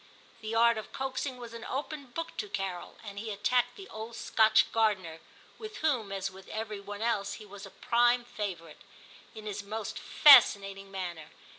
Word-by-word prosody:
The 220 +1 -4
art 235 0 +4
of 215 - -10
coaxing 265 0 -3
was 240 -2 -9
an 230 -1 -8
open 285 +1 -5
book 330 +7 -6
to 210 - -4
Carol, 195 -3 -4
and 200 -2 -7
he 220 +1 -5
attacked 235 +4 +1
the 390 -1 -10
old 220 +2 -7
Scotch 220 -1 +3
gardener, 195 -8 0 0.2
— - - -26
with 435 -1 -8
whom, 240 -10 +1
as 195 0 -3
with 190 0 -14
every 215 -1 -5
one 205 +2 -7
else, 210 -4 0
he 215 - -9
was 200 0 -10
a - - -12
prime 240 +3 +2
favourite, 190 -8 -6 0.3
— - - -22
in 215 -1 -9
his 205 -1 -4
most 210 +1 -5
fascinating 200 -8 +6
manner. 175 -5 -6
215 Hz, 185 wpm, -30 LUFS, 195-240 Hz, 0.3 s, fascinating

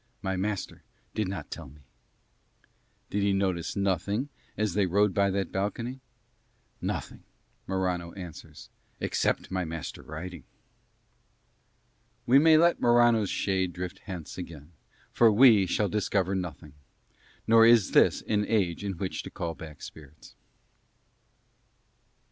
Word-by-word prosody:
My 95 -1 -1
master 100 +1 -3 0.3
did 105 -2 -1
not 95 -5 -6
tell 80 -5 -7
me." 75 +2 -18 1.3
Did 100 - 0
he 100 0 +2
notice 95 -4 -1
nothing 100 - -1 0.3
as 105 -4 0
they 100 -2 +2
rode 100 +2 +2
by 100 +1 +2
that 100 0 -2
balcony? 115 +6 -3 0.8
"Nothing," - - -4 0.4
Morano 90 -2 -2
answers, 90 -5 -10 0.3
"except - - -1
my 95 -1 -1
master 80 -4 -6
riding." 80 0 -8 1.8
We 130 +3 +6
may 160 +1 +6
let 170 +2 +3
Morano's 120 -3 +4
shade 95 -2 -1
drift 90 0 -6
hence 90 -3 -7
again, 80 -3 -9 0.4
for 115 -2 +5
we 110 -4 +6
shall 105 +4 +1
discover 100 -2 0
nothing: 85 -6 -5 0.7
nor 115 0 +6
is 115 -4 +5
this - - +4
an 105 -1 0
age 95 -7 0
to 100 -1 -3
which 95 +1 -4
to - - -9
call 85 -1 -4
back 80 -2 -11
spirits. 75 -1 -13
95 Hz, 125 wpm, -28 LUFS, 85-105 Hz, 1.8 s, We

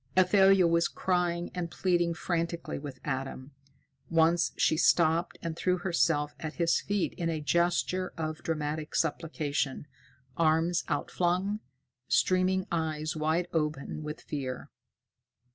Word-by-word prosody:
Athalia 190 0 +6
was 170 0 +3
crying 175 -2 -1
and 175 -2 -3
pleading 175 -1 +1
frantically 170 -2 -2
with 140 -3 -8
Adam. 135 +1 -4 0.6
Once 165 +1 +3
she - - +3
stopped 165 +1 +3
and 165 -1 -3
threw 180 +2 +1
herself 165 -5 +1
at 155 -1 -5
his 170 -1 +2
feet 205 -2 -1
in 170 -1 0
a 160 -2 -1
gesture 175 +4 +1
of 155 -1 -3
dramatic 155 -1 -3
supplication, 150 -4 -1 0.5
arms 165 +2 +2
outflung, 180 +7 0 0.5
streaming 185 0 +2
eyes 155 -2 -1
wide 160 +3 0
open 150 -2 -2
with 150 0 -6
fear. 130 -4 -5
165 Hz, 120 wpm, -29 LUFS, 155-175 Hz, 0.6 s, Athalia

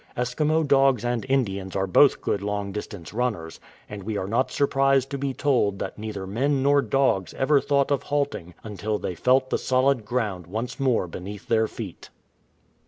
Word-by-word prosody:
Eskimo 150 +6 +1
dogs 135 -4 +3
and 120 0 -1
Indians 100 -8 -1
are 95 0 +1
both 130 +9 +4
good 100 - -1
long 100 0 -3
distance 100 -3 -7
runners, 105 -9 -2 0.3
and 105 -1 -7
we 105 +2 -3
are 95 - -2
not 115 +6 0
surprised 135 -1 +2
to 140 - -2
be 140 0 -1
told 125 -8 +1
that - - -5
neither 105 -3 -5
men 130 +7 0
nor 140 0 +4
dogs 125 -6 +1
ever 140 +1 +3
thought 140 -1 +1
of 140 - +2
halt 145 -1 -1
ing 85 0 -9
until 105 0 -3
they 90 - -4
felt 130 +7 +2
the - - +1
solid 130 -1 +2
ground 105 -6 -2
once 110 +9 -4
more 130 -8 +2
beneath 95 +4 -8
their 110 -1 +2
feet. 105 -7 -8
120 Hz, 180 wpm, -25 LUFS, 100-135 Hz, 0.3 s, both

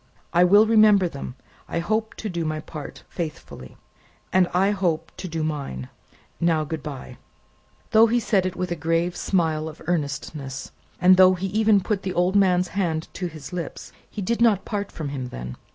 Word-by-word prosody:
"I 175 +1 +5
will 205 +4 +6
remember 215 -4 +5
them. 140 -5 -7 0.3
I - - -3
hope 215 +6 -1
to 220 - -5
do 170 -4 -2
my 155 -1 -2
part 155 -1 -9
faithfully." 150 - -7 0.6
"And 185 -1 +5
I 190 +3 +3
hope 165 -5 -1
to 185 - -5
do 165 -2 -3
mine. 140 - -4 0.5
Now, 165 -2 +2
good 155 0 -5
bye!" 140 -4 -8 0.7
Though 225 +1 +7
he 240 +2 +2
said 200 -5 +1
it 185 - -5
with 180 0 -3
a - - 0
grave 165 +2 0
smile 160 -4 0
of 155 - -12
earnestness, 140 -4 -3 0.3
and 185 +1 +6
though 185 0 +7
he 180 +2 -4
even 215 0 +3
put 200 0 -1
the 185 -2 -4
old 180 +2 +2
man's 180 -3 +3
hand 165 -5 -2
to 180 - -3
his 155 -2 -10
lips, 175 -2 -6 0.2
he 205 - -5
did 230 +4 -1
not 220 -5 +4
part 205 -1 -3
from 155 -3 -5
him 135 -3 -4
then. 60 - -7
175 Hz, 185 wpm, -24 LUFS, 155-195 Hz, 0.7 s, Though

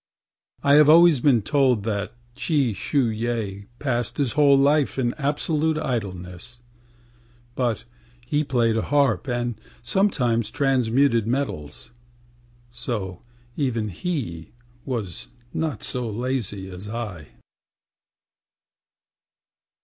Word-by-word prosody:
I 140 - +4
have 150 - +5
always 165 -2 +7
been 120 -5 +3
told 130 -6 +2
that 100 0 -3 0.2
Chi 140 -8 +1
Shu 135 +7 0
yeh 110 -3 -3
Passed 120 -4 -2
his 140 -5 +1
whole 145 -2 +5
life 140 +1 +3
in 120 -2 0
absolute 155 +2 0
idleness. 105 - -4 1.0
But 120 -3 -1 0.4
he 145 +4 +1
played 120 -5 +1
the - - +1
harp 140 -5 +1
and 120 -3 -2 0.2
sometimes 120 - +1
transmuted 125 -2 +2
metals, 115 - -3 0.8
So 110 -7 -4 0.3
even 115 -7 -1
he 90 - -4 0.3
was 110 - -4 0.3
not 160 -3 -2
so 125 -2 -3
lazy 110 -4 -2
as 95 +2 -9
I. 105 -9 -5
120 Hz, 105 wpm, -24 LUFS, 110-140 Hz, 1.0 s, always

